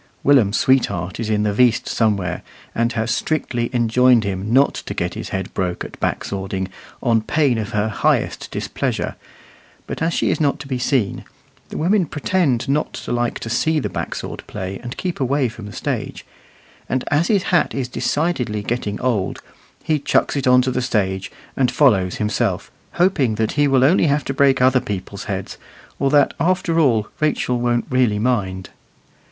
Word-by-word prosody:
Willum's 120 Hz, -8 st, +4 dB
sweetheart 100 Hz, -9 st, +1 dB
is 115 Hz, -2 st, -2 dB
in 105 Hz, -1 st, +1 dB
the 105 Hz, -1 st, 0 dB
"veast" 120 Hz, +1 st, +3 dB
somewhere, 100 Hz, -6 st, 0 dB, 0.3 s
and 115 Hz, +1 st, 0 dB
has 115 Hz, +1 st, -1 dB
strictly 120 Hz, -3 st, -1 dB
enjoined 120 Hz, 0 st, +4 dB
him 100 Hz, +1 st, -3 dB
not 135 Hz, +3 st, +4 dB
to -, -, -6 dB
get 85 Hz, 0 st, -2 dB
his -, -, -6 dB
head 95 Hz, -1 st, -4 dB
broke 90 Hz, -2 st, -2 dB
at -, -, -11 dB
back -, -, -1 dB
swording, 95 Hz, -1 st, -3 dB, 0.3 s
on 115 Hz, -3 st, +3 dB
pain 130 Hz, 0 st, +1 dB
of 105 Hz, -, -3 dB
her 105 Hz, +1 st, 0 dB
highest 110 Hz, -, 0 dB
displeasure; -, -, -3 dB, 0.7 s
but -, -, -6 dB
as 165 Hz, +1 st, +1 dB
she -, -, +1 dB
is -, -, -1 dB
not 145 Hz, -2 st, +2 dB
to 140 Hz, -, -8 dB
be 130 Hz, -2 st, -2 dB
seen 125 Hz, -5 st, 0 dB, 0.5 s
(the -, -, -6 dB
women 180 Hz, +2 st, +2 dB
pretend 145 Hz, -4 st, 0 dB
not 145 Hz, +3 st, 0 dB
to -, -, -6 dB
like 120 Hz, -1 st, 0 dB
to -, -, -5 dB
see 155 Hz, +7 st, +1 dB
the 150 Hz, -, -2 dB
backsword -, -, -5 dB
play, 95 Hz, +1 st, -5 dB
and 120 Hz, +1 st, -7 dB
keep 180 Hz, -4 st, -3 dB
away 135 Hz, 0 st, +1 dB
from 110 Hz, -2 st, -9 dB
the -, -, -8 dB
stage), -, -, -4 dB, 0.6 s
and 130 Hz, -1 st, 0 dB
as 150 Hz, +4 st, +2 dB
his 200 Hz, -4 st, +2 dB
hat 175 Hz, -3 st, +1 dB
is 135 Hz, -2 st, -2 dB
decidedly 125 Hz, -6 st, -1 dB
getting 105 Hz, -3 st, -2 dB
old, 115 Hz, -7 st, -1 dB, 0.4 s
he 155 Hz, -1 st, +1 dB
chucks 140 Hz, -, +1 dB
it 135 Hz, -2 st, -1 dB
on 125 Hz, 0 st, +6 dB
to 130 Hz, -, 0 dB
the 125 Hz, -, -1 dB
stage, 95 Hz, -5 st, -1 dB, 0.2 s
and 130 Hz, -2 st, +2 dB
follows 110 Hz, -9 st, +3 dB
himself, 105 Hz, -3 st, -1 dB, 0.2 s
hoping 170 Hz, -, +2 dB
that 110 Hz, 0 st, 0 dB
he 145 Hz, -1 st, +2 dB
will 135 Hz, -2 st, +3 dB
only 165 Hz, +4 st, +4 dB
have 145 Hz, 0 st, +1 dB
to 135 Hz, -, -2 dB
break 135 Hz, -1 st, +3 dB
other 130 Hz, 0 st, +4 dB
people's 100 Hz, 0 st, -5 dB
heads, 95 Hz, -2 st, -5 dB, 0.4 s
or 140 Hz, -, +2 dB
that, 145 Hz, -1 st, +4 dB
after 170 Hz, -1 st, +1 dB
all, 115 Hz, -9 st, +3 dB
Rachel 145 Hz, -5 st, 0 dB
won't 120 Hz, 0 st, +1 dB
really 125 Hz, -5 st, +2 dB
mind. 100 Hz, -5 st, -1 dB
125 Hz, 180 wpm, -20 LUFS, 105-140 Hz, 0.7 s, on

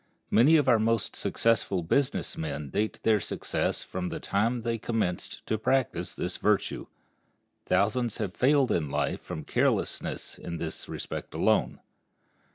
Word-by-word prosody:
Many 135 Hz, +9 st, +6 dB
of 145 Hz, -3 st, +2 dB
our 120 Hz, -3 st, +5 dB
most 115 Hz, -1 st, 0 dB
successful 105 Hz, -5 st, +1 dB
business 130 Hz, +11 st, 0 dB
men 75 Hz, -3 st, -4 dB
date 110 Hz, +1 st, -1 dB
their 110 Hz, -2 st, +4 dB
success -, -, -2 dB
from 90 Hz, -1 st, -4 dB
the -, -, -4 dB
time 115 Hz, +4 st, 0 dB
they 115 Hz, -1 st, -1 dB
commenced 105 Hz, -7 st, -2 dB
to 110 Hz, -, -1 dB
practice 130 Hz, +3 st, 0 dB
this -, -, -3 dB
virtue. -, -, 0 dB, 0.8 s
Thousands 115 Hz, +2 st, +1 dB
have 100 Hz, -4 st, -3 dB
failed 135 Hz, 0 st, +3 dB
in 75 Hz, -4 st, 0 dB
life 70 Hz, 0 st, -1 dB
from 80 Hz, -, -6 dB
carelessness -, -, 0 dB
in 85 Hz, -1 st, -5 dB
this 80 Hz, -1 st, -5 dB
respect -, -, -6 dB
alone. -, -, +1 dB
110 Hz, 145 wpm, -28 LUFS, 90-120 Hz, 0.8 s, Many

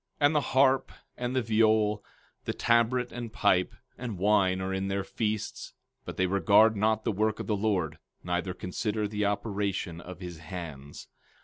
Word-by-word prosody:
15:12 145 Hz, -, +4 dB
And 145 Hz, +2 st, +3 dB
the 150 Hz, -, +4 dB
harp, 135 Hz, 0 st, +3 dB, 0.2 s
and 125 Hz, +1 st, -3 dB
the 130 Hz, -, +3 dB
viol, 110 Hz, -1 st, +2 dB, 0.4 s
the -, -, -1 dB
tabret, 120 Hz, +1 st, +2 dB
and 120 Hz, -2 st, -6 dB
pipe, 95 Hz, -4 st, +2 dB, 0.3 s
and 120 Hz, -5 st, -4 dB
wine 95 Hz, -1 st, +3 dB
are 95 Hz, 0 st, -2 dB
in 95 Hz, 0 st, -1 dB
their 100 Hz, 0 st, -1 dB
feasts; 105 Hz, +1 st, -3 dB, 0.3 s
but -, -, -7 dB
they 95 Hz, -, +2 dB
regard 100 Hz, +4 st, +4 dB
not 110 Hz, +1 st, +1 dB
the -, -, 0 dB
work 110 Hz, +1 st, 0 dB
of -, -, -4 dB
the 105 Hz, -, 0 dB
Lord, 95 Hz, -7 st, -1 dB, 0.2 s
neither 90 Hz, +1 st, -2 dB
consider 105 Hz, +4 st, -2 dB
the 105 Hz, 0 st, -1 dB
operation 100 Hz, -4 st, -2 dB
of 90 Hz, 0 st, -10 dB
his 90 Hz, -3 st, -7 dB
hands. 80 Hz, -4 st, -8 dB
105 Hz, 175 wpm, -29 LUFS, 95-110 Hz, 0.4 s, 15:12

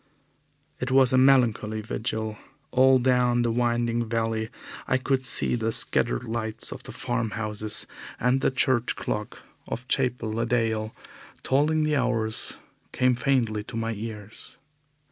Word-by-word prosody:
It 125 Hz, -, -2 dB
was 130 Hz, -1 st, +4 dB
a -, -, +5 dB
melancholy 115 Hz, -5 st, +3 dB
vigil. 110 Hz, 0 st, -3 dB, 0.4 s
All 130 Hz, +1 st, +5 dB
down 125 Hz, -1 st, +2 dB
the 120 Hz, -, +1 dB
winding 120 Hz, -1 st, 0 dB
valley 115 Hz, -1 st, -1 dB, 0.4 s
I 130 Hz, -, +2 dB
could 130 Hz, 0 st, -1 dB
see -, -, +2 dB
the 115 Hz, -2 st, 0 dB
scattered -, -, +1 dB
lights 110 Hz, -1 st, -3 dB
of -, -, -7 dB
the -, -, -10 dB
farm 120 Hz, -2 st, -2 dB
houses, 105 Hz, -1 st, 0 dB, 0.3 s
and 125 Hz, +3 st, +2 dB
the -, -, +3 dB
church 130 Hz, -2 st, +1 dB
clock 105 Hz, 0 st, -5 dB, 0.2 s
of 125 Hz, +2 st, -5 dB
Chapel 125 Hz, -4 st, 0 dB
le 115 Hz, +1 st, -1 dB
Dale 110 Hz, -2 st, 0 dB, 0.5 s
tolling 150 Hz, +4 st, +2 dB
the 155 Hz, -1 st, +1 dB
hours 115 Hz, -4 st, -1 dB, 0.3 s
came 125 Hz, 0 st, +2 dB
faintly 120 Hz, -5 st, 0 dB
to 115 Hz, -, -7 dB
my 115 Hz, 0 st, -2 dB
ears. 105 Hz, -1 st, -9 dB
120 Hz, 145 wpm, -26 LUFS, 110-130 Hz, 0.5 s, a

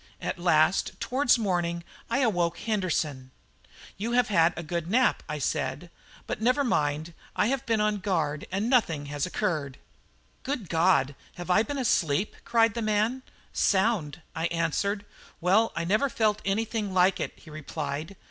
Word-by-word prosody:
At -, -, -4 dB
last, -, -, +2 dB
towards 260 Hz, 0 st, +2 dB
morning, 175 Hz, -5 st, -1 dB, 0.3 s
I 270 Hz, -, +1 dB
awoke 175 Hz, -8 st, +1 dB
Henderson. 165 Hz, -, -1 dB, 0.7 s
"You 225 Hz, +4 st, -2 dB
have 245 Hz, -2 st, +3 dB
had 170 Hz, -4 st, +4 dB
a 170 Hz, -, -4 dB
good 170 Hz, +1 st, -3 dB
nap," 250 Hz, +5 st, +3 dB
I 150 Hz, -, -2 dB
said; 135 Hz, +4 st, -2 dB, 0.3 s
"but -, -, -4 dB
never 255 Hz, +5 st, +3 dB
mind, 155 Hz, -, 0 dB, 0.2 s
I 210 Hz, -, +2 dB
have 270 Hz, -1 st, -2 dB
been 225 Hz, -2 st, +2 dB
on 210 Hz, 0 st, +1 dB
guard 160 Hz, -7 st, -1 dB
and 200 Hz, +4 st, -1 dB
nothing 170 Hz, -, +2 dB
has 145 Hz, +3 st, -1 dB
occurred." 155 Hz, -9 st, -2 dB, 0.6 s
"Good 255 Hz, -, -4 dB
God! 160 Hz, -5 st, +3 dB, 0.2 s
have 175 Hz, +1 st, -4 dB
I 180 Hz, -, +5 dB
been 280 Hz, +6 st, -3 dB
asleep?" 195 Hz, -, +1 dB
cried 230 Hz, -2 st, +3 dB
the 235 Hz, -, -3 dB
man. 215 Hz, +4 st, +1 dB, 0.3 s
"Sound," 190 Hz, -7 st, +1 dB
I 165 Hz, +1 st, 0 dB
answered. 170 Hz, +5 st, -1 dB, 0.3 s
"Well, 195 Hz, +6 st, +3 dB
I 170 Hz, -, -2 dB
never 215 Hz, +10 st, +2 dB
felt 215 Hz, -3 st, +1 dB
anything 210 Hz, 0 st, -1 dB
like 185 Hz, +1 st, +4 dB
it," -, -, -3 dB
he 155 Hz, -, -15 dB
replied. 155 Hz, +2 st, -5 dB
190 Hz, 155 wpm, -27 LUFS, 165-225 Hz, 0.7 s, I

